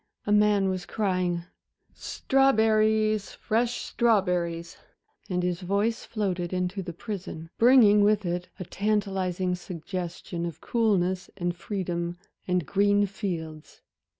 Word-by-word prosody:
A 205 - -1
man 210 -1 +4
was 185 -2 -3
crying 180 -4 -1 0.5
"Strawberries, 220 -5 +2
fresh 235 +2 -1
strawberries!" 180 -7 0 0.5
and 180 -1 -1
his 180 0 -1
voice 200 +5 0
floated 185 -6 -2
in 180 -1 0
to 195 +2 -5
the 180 -2 -6
prison, 175 -4 -7
bringing 225 -4 +7
with 210 -1 +3
it 175 +1 -3
a - - -3
tantalizing 190 -3 -1
suggestion 175 -1 -5
of 165 - -8
coolness 190 -6 0
and 175 -2 -2
freedom 175 -2 -3 0.3
and 180 -3 +1
green 205 +3 +3
fields. 170 -6 -6
190 Hz, 120 wpm, -27 LUFS, 175-210 Hz, 0.5 s, bringing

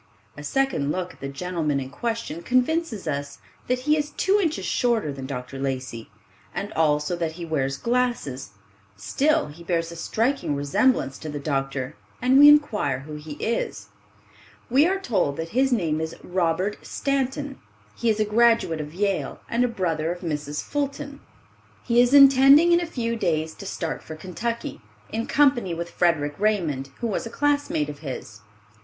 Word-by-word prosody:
A 145 - -9
second 150 - 0
look 180 +1 -3
at - - -22
the 140 - -5
gentleman 155 0 -2
in 130 0 -6
question 225 -1 -3
convinces 255 - 0
us 140 -1 -3 0.3
that 250 0 0
he 300 +3 +3
is 295 -1 -1
two 390 +6 +2
inches 325 -4 -1
shorter 235 - +1
than 135 -1 -7
Dr. 135 0 -6
Lacey, 130 -4 -4 0.5
and 200 +3 -4
also 150 +1 +1
that 165 -2 -2
he 170 +1 -7
wears 135 -4 -1
glasses; 235 - -1 0.5
still 300 - +1
be 170 - -12
bears 170 -1 -1
a - - -8
striking 225 - -1
resemblance 140 - +1
to 155 - -6
the 150 - -4
doctor, 135 -3 -2 0.2
and 255 +2 +4
we 290 +1 +10
inquire 215 - +3
who 150 +2 -8
he 150 0 -8
is. 230 +10 -3 0.8
We 280 +6 +5
are 385 +2 +1
told 190 - 0
that 165 0 -4
his 265 +5 +2
name 165 -9 +1
is 160 0 -4
Robert 180 +2 -1
Stanton. 275 0 -2 0.4
He 235 - 0
is 215 -1 +1
a 215 - +3
graduate 225 -7 +3
of 150 +2 -8
Yale 195 0 -1
and 235 +2 +1
a - - +3
brother 170 -8 -1
of 175 - -6
Mrs. 150 -3 -3
Fulton, 285 0 -3 0.6
He 235 +1 +4
is 245 0 +3
intending 275 +4 +8
in 345 0 +5
a 345 - -3
few 235 -7 -2
days 160 -7 -1
to 200 - -9
start 165 -4 -4
for 155 - -8
Kentucky, 220 - -4 0.3
in 225 +1 -2
company 255 -11 +3
with 170 +1 -5
Frederic 150 -4 +1
Raymond, 170 -11 0
who 235 - 0
was 225 +3 -2
a - - -7
classmate 285 - 0
of 145 -1 -7
his. 125 -7 -7
180 Hz, 175 wpm, -24 LUFS, -, 0.8 s, we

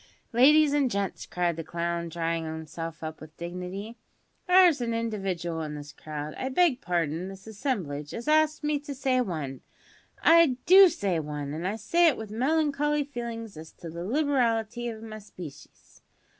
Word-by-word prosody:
"Ladies 290 +5 +6
and 285 -3 +2
gents," 200 -3 -3
cried 175 -2 -1
the 165 - -4
clown, 170 +1 -3
drawing 165 0 -2
himself 160 +1 -6
up 155 0 -6
with 155 0 -12
dignity; 180 +6 -6 0.5
"there's 360 -6 +6
an 230 -1 -1
individual 190 -7 -2
in 150 -1 -5
this 145 0 -9
crowd 150 0 -6
I 260 - -2
beg 275 -2 +3
parden, 170 0 -1
this 195 0 -11
assemblage 195 - -3
as 235 +4 -6
asks 310 0 +3
me 300 -1 +1
to 285 -1 -7
say 260 -1 +1
`one.' 155 - -3 0.6
I 330 -6 +6
do 380 +1 +9
say 195 - -1
`one,' 150 -2 -5
an' 165 +4 -3
I 200 - -1
say 335 +11 +3
it 300 - +3
with 220 -2 -7
melancholy 295 +3 +1
feelin's 235 - -6
as 160 +1 -10
to 165 - -9
the 170 +1 -6
liberality 240 - 0
of 225 -1 -6
my 215 -1 -8
species. 180 -8 -12
210 Hz, 170 wpm, -27 LUFS, 165-275 Hz, 0.6 s, do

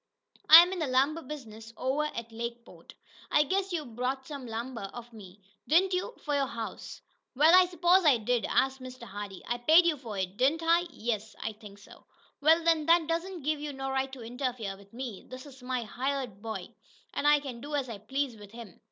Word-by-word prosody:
"I'm 345 +4 +10
in 370 - -4
the 315 - -1
lumber 275 +5 +2
business 225 -7 -9
over 270 +4 0
at 235 -6 -6
Lakeport. 235 +1 -8 0.3
I 300 - +4
guess 385 +5 -1
you 325 -4 -2
bought 250 +3 -3
some 275 -3 -7
lumber 230 -2 -5
of 240 0 -10
me, 200 -2 -13 0.2
didn't 370 +5 +4
you, 365 +7 -2
for 295 - -2
your 280 -1 +1
house." 230 -3 -7 0.3
"Wa'al, 335 +6 +6
s'posin' 350 0 +3
I 270 -5 +6
did?" 235 +1 0
asked 265 0 +1
Mr. 255 0 -9
Hardee. 200 -1 -8
"I 240 0 -2
paid 320 +8 +6
you 330 -3 +2
for 230 -6 -7
it, 190 +1 -3
didn't 285 +7 +2
I?" 340 +2 +3
"Yes, 220 -6 -4
I 220 - -4
think 210 -2 -13
so." 205 - -16 0.4
"Wa'al, 320 +3 +5
then 325 -2 +2
that 335 0 +5
don't 335 +1 -3
give 305 +1 0
you 295 -1 -5
no 270 0 -4
right 265 0 -1
to 255 -3 -8
interfere 240 -4 -4
with 200 0 -18
me! 240 -4 -7
This 255 +2 -9
is 270 -2 -14
my 250 -1 -2
hired 255 -2 -3
boy, 225 0 -6 0.4
an' 290 - 0
I 295 0 +6
can 260 -5 -8
do 295 +2 -4
as 275 -3 -1
I 225 -4 -7
please 265 +4 -2
with 205 0 -13
him." 230 -6 -11
260 Hz, 205 wpm, -29 LUFS, 230-305 Hz, 0.4 s, I'm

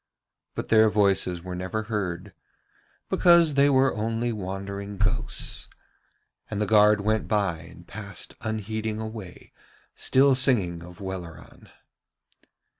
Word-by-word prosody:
But - - -5
their 110 -1 +6
voices 95 -4 +1
were 90 0 -6
never 95 +5 -3
heard 100 -6 -4 0.7
because 170 -3 +5
they 140 +1 +4
were 135 -1 +3
only 115 +2 -1
wandering 100 0 -5
ghosts. 110 +3 -1 0.8
And 105 - -3
the 105 - +1
guard 105 -1 +5
went 110 +1 0
by 100 -6 0
and 85 +1 -14
passed 100 -2 -7
unheeding 110 0 -3
away, 110 -4 -8 0.4
still 135 +1 +3
singing 105 -10 +1
of 90 +3 -12
Welleran. 95 -4 -8
105 Hz, 115 wpm, -26 LUFS, 95-110 Hz, 0.8 s, their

